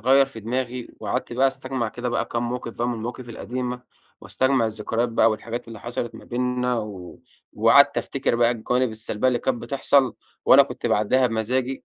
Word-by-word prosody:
غيّر 135 +4 +5
في 125 -4 -10
دماغي، 125 +2 -3
وقعدت - - -3
بقى 130 +3 +3
أستجمع 130 -3 -3
كده 120 +3 -4
بقى 120 - 0
كام 120 0 -2
موقف 120 -1 -4
بقى 120 +1 -2
من 120 - -1
المواقف 120 +2 -6
القديمة، 125 +1 -4 0.4
واستجمع 130 -3 +1
الذكريات 110 +2 -1
بقى 115 0 +3
والحاجات 115 +2 -5
اللي 110 -2 -9
حصلت 120 0 -4
ما - - -11
بيننا، 125 0 -1
و 100 -5 -8 0.3
وقعدت - - +5
أفتكر - - -1
بقى 120 0 +4
الجوانب 125 +2 0
السلبيّة 110 +2 -1
اللي 125 -1 +1
كانت 120 -1 -2
بتحصل 135 0 +2 0.3
وأنا - - +8
كنت - - -5
باعدّيها 125 +5 +3
بمزاجي، 125 +3 -2
120 Hz, 175 wpm, -24 LUFS, 115-125 Hz, 0.4 s, وأنا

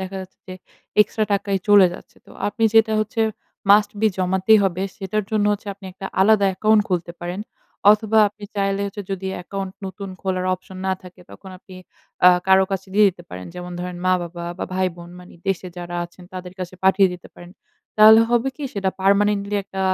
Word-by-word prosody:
দেখা 190 +1 -6
যাচ্ছে 185 0 -12
যে, 185 - -6 0.5
এক্সট্রা 215 +1 +2
টাকাই 200 -1 0
চলে 200 -2 +7
যাচ্ছে। - - -14
তো - - -17 0.2
আপনি 225 +2 -1
যেটা 220 0 +5
হচ্ছে 225 +2 -3 0.5
must 205 0 +6
be 220 - +4
জমাতেই 190 +3 +3
হবে, 185 -1 -1
সেটার 205 +1 -3
জন্য 215 -1 +1
হচ্ছে 205 0 -5
আপনি 200 0 -18
একটা 190 +1 -7
আলাদা 200 0 +4
অ্যাকাউন্ট 215 +3 +3
খুলতে 175 -2 -2
পারেন। 175 +3 -5 0.5
অথবা, 220 0 +1
আপনি 205 0 -13
চাইলে 195 0 0
হচ্ছে 205 +1 -6
যদি 190 0 -3
অ্যাকাউন্ট 190 +1 -6
নতুন 195 +1 -7
খোলার 185 -1 -2
অপশন 185 +1 -12
না 190 - +1
থাকে, 180 -1 -14
তখন 190 - -12
আপনি 185 0 -15 0.5
আ - - +11 0.2
কারো 190 0 +5
কাছে 190 0 -4
দিয়ে 210 0 +6
দিতে 175 -2 -8
পারেন। 90 0 -8
যেমন 180 0 -7
ধরেন, 180 0 -5
মা-বাবা, 175 -1 -1
বা - - -2
ভাই-বোন, 175 -2 -3
মানে 180 - -15
দেশে 185 -1 -2
যারা 175 0 -6
আছেন 175 +1 -14
তাদের 180 -1 -7
কাছে 185 0 -6
পাঠিয়ে 190 0 +5
দিতে 180 - -11
পারেন। 175 0 -13 0.5
তাহলে 220 +1 +9
হবে 240 +2 +2
কি? 295 - -6
সেটা 195 -1 0
permanently 200 +1 +2
একটা 190 0 -7
190 Hz, 190 wpm, -21 LUFS, 180-205 Hz, 0.5 s, আ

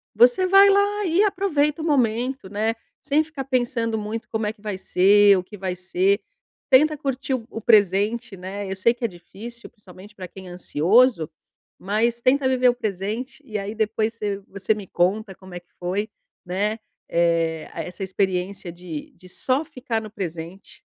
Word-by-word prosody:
você 250 +11 +5
vai 395 +1 +7
lá 405 +1 +2
e 355 +5 +3
aproveita 335 -7 +1
o - - -3
momento, 250 - 0
né, 215 +2 0 0.3
sem 300 +2 +2
ficar 300 -4 -7
pensando 240 -3 0
muito 215 +2 -5
como 220 -2 -1
é 210 - -2
que 210 - -26
vai 210 -3 -4
ser, 200 +2 +5
o 180 - -2
que 210 +3 -12
vai 185 -1 -3
ser, 185 +3 +1 0.5
tenta 300 +3 +5
curtir 270 -2 -2
o 230 -3 -6
o 225 - -6
presente, 205 +1 +3
né? 195 +2 -6
Eu - - -2
sei 230 +5 +3
que 240 0 -4
é - - +3
difícil, 210 +6 -10
principalmente 205 0 -15
pra 185 -2 -7
quem 190 +1 -12
é - - -9
ansioso, 180 - +3 0.5
mas 230 +4 0
tenta 265 +2 +3
viver 255 -1 +4
o - - +3
presente, 220 +4 -4
e 215 -4 -4
aí 200 +2 -5
depois 220 0 0
você 205 -3 -3
você 200 +2 0
me 205 -3 -8
conta 190 +3 0
como 190 -1 -14
é - - -4
que 175 - -43
foi, 195 +4 -2 0.4
né, 205 +5 -1 0.3
eh, 165 -2 +1
essa 180 +2 -5
experiência 190 -1 -2
de 170 -3 -8
de 185 0 -16
só 265 - 0
ficar 245 -5 -3
no 215 - -8
presente. 175 -2 -7
215 Hz, 180 wpm, -23 LUFS, 190-250 Hz, 0.5 s, vai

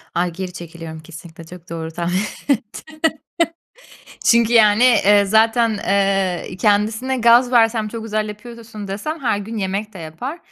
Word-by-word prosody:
Ay, 175 0 0
geri 185 +1 -6
çekiliyorum 165 -2 -9
kesinlikle, 165 +1 -12
çok 175 +1 -13
doğru 165 -1 -5
tahmin 175 +2 -2 0.4
ettin. 310 +9 -14 1.2
Çünkü, 235 0 +4
yani, 220 0 +5
eee, 205 -4 +5
zaten, 225 +1 +2
eee, 195 -2 0
kendisine 215 +6 +1
gaz 240 +2 +5
versem 225 -2 +3
çok 225 +1 -7
güzel 215 -1 -2
yapıyorsun 220 -1 -9
desem 305 +12 -4
her 225 -6 0
gün 220 +3 -7
yemek 200 +1 -3
de 190 - -11
yapar. 170 - -7
210 Hz, 145 wpm, -19 LUFS, 180-230 Hz, 1.2 s, yani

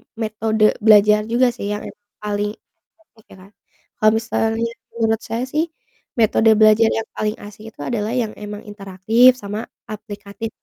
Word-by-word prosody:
metode 220 -1 +1
belajar 210 -1 +5
juga 240 +3 +3
sih 235 -4 -6
yang 210 - -5
emang 205 0 -12 0.2
paling 205 0 -1 0.5
efektif 220 -8 -26
ya, - - -12
Kak. 195 - -18 0.5
Kalo 215 - +5
misalnya 225 +1 -1 0.2
menurut 225 -1 +1
saya 230 +2 -2
sih, 300 +5 -1 0.5
metode 220 0 +4
belajar 215 +1 +6
yang 225 0 -3
paling 215 0 -2
asik 210 +1 -12
itu - - -33
adalah 220 -2 -2
yang 230 -4 -1
emang 210 0 -7
interaktif 210 +5 +3
sama 210 0 -6 0.2
aplikatif, 210 +1 -7
215 Hz, 155 wpm, -20 LUFS, 210-225 Hz, 0.5 s, belajar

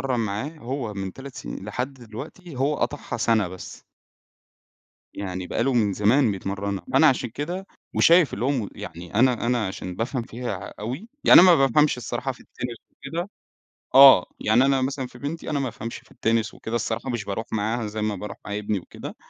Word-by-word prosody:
يتمرّن 125 -2 +1
معاه 110 +5 -2
هو 120 -4 -4
من 95 -1 -4
3 135 0 -10
سنين 95 - -7
لحد 125 +6 -3
دلوقتي 135 +7 -10
هو 140 +3 +1
قطعها 145 - -3
سَنة 110 -4 +2
بس. 95 0 -10 1.3
يعني 95 -2 -4
بقى 115 - -1
له 135 +1 +1
من 105 -4 +2
زمان 110 +4 +3
بيتمرّنها، 100 -1 -4
فأنا 135 +4 +6
عشان 125 -3 0
كده 175 - -4 0.3
وشايف 170 -2 +5
اللي 115 - -3
هو 140 - +2
م 120 -8 -1
يعني 85 +2 -9
أنا 120 0 +3
أنا 120 -3 +1
عشان 95 -1 -6
بافهم 120 +3 -2
فيها 120 +2 -5
ع - - -8
أوي، 130 - -5 0.2
يعني - - +10
أنا 185 - +8
ما 180 - +8
بافهمش 150 +3 +3
الصراحة 125 +2 -3
في - - -18
التِنِس 120 -2 -7
وكده 175 +4 -5 0.7
آه 135 -9 +10
يعني 120 +5 +4
أنا 135 -1 +2
مثلًا 135 0 -2
في 125 - -15
بنتي 145 +5 -5
أنا 150 -2 0
ما 135 - -1
بافهمش 115 -1 -6
في - - -18
التِنِس 115 0 0
وكده 115 +1 -5
الصراحة 115 +2 -2
مش 120 -2 -3
باروح 100 +3 -3
معاها 110 +2 -1
زي 105 +1 -4
ما 105 -1 0
باروح 100 +1 -7
مع 105 0 -3
ابني 105 -1 -1
وكده، - - -9
120 Hz, 195 wpm, -24 LUFS, 105-135 Hz, 1.3 s, يعني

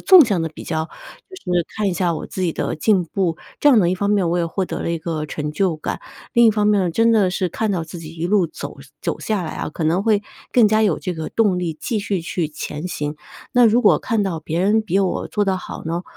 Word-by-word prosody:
纵 370 -6 +8
向 195 -7 0
的 160 - -1
比 155 - -11
较， 160 0 -2 0.4
就 375 - -10 0.2
是 175 -2 +2
看 210 -2 +1
一 185 - -1
下 175 -1 +1
我 - - -5
自 185 - -5
己 170 -3 +1
的 - - -2
进 185 +2 +2
步。 170 -1 -1 0.2
这 295 - +5
样 250 -6 +6
呢， 175 - +3
一 180 - +1
方 200 +2 -1
面 195 -5 +2
我 175 - +1
也 170 - +1
获 185 +3 -2
得 - - -5
了 - - -2
一 170 - -1
个 155 -2 -3
成 150 0 -4
就 175 -1 +1
感， - - -4 0.3
另 235 -2 +5
一 225 - +7
方 210 -1 +1
面， 195 -4 +3
真 230 +5 +3
的 200 -5 +3
是 185 -1 -1
看 220 +5 -2
到 170 -4 -1
自 170 +1 -9
己 160 - -8
一 165 +2 -2
路 190 -4 +2
走 145 -2 -8 0.2
走 - - -3
下 210 -4 -1
来 160 - -5
啊， - - -4
可 160 - -4
能 170 +5 +2
会 210 -2 +3 0.3
更 235 -4 +5
加 215 +1 +3
有 195 -7 +2
这 180 -3 -4
个 160 -1 -4
动 200 -5 +1
力 165 -3 -3
继 220 -3 -1
续 200 -3 -1
去 165 -1 -2
前 150 +2 -5
行。 150 -3 -3 0.4
那 245 -1 +6
如 230 +2 +5
果 215 - +4
看 225 -4 0
到 165 -5 -2
别 160 +2 -3
人 215 +3 +3
比 195 -2 0
我 190 -2 -1
做 210 - 0
得 190 -1 +1
好 185 - -8
呢， 170 +2 -2
185 Hz, 290 characters per minute, -21 LUFS, 165-210 Hz, 0.4 s, 纵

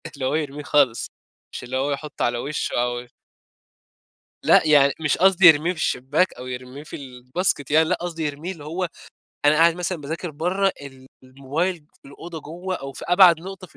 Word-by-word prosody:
اللى 135 -2 -4
هو 135 +3 0
يرميه 150 -2 -3
خالص، 130 -6 +2 0.5
مش - - -6
اللي 125 +1 -4
هو 140 +2 -1
يحطه 145 +1 -3
على 120 0 0
وشه 145 +5 -3
أو 120 0 -3 1.4
لأ، - - +5
يعني 140 -2 +5
مش 150 -3 0
قصدي 190 0 +4
يرميه 160 +2 +5
في - - -16
الشباك، 150 +7 0
أو 125 - -10
يرميه 125 +3 -8
في - - -9
الباسكت 135 +3 -3
يعني، 160 +1 +4
لأ - - +2
قصدي 170 -2 -4
يرميه 150 +5 -4
اللي 155 -6 -10
هو، 175 +4 -2 0.6
أنا 145 +1 +5
قاعد 165 +2 +5
مثلًا 180 -1 -3
باذاكر 160 +4 -5
برّة، 180 +6 0 0.5
الموبايل 140 +8 -2 0.3
في - - -15
الأوضة 165 +3 -9
جوّة 175 +5 -6
أو 135 -3 -8
في - - -9
أبعد 180 -2 +6
نقطة 190 +1 -9
في - - -22
150 Hz, 185 wpm, -23 LUFS, 135-175 Hz, 1.4 s, أبعد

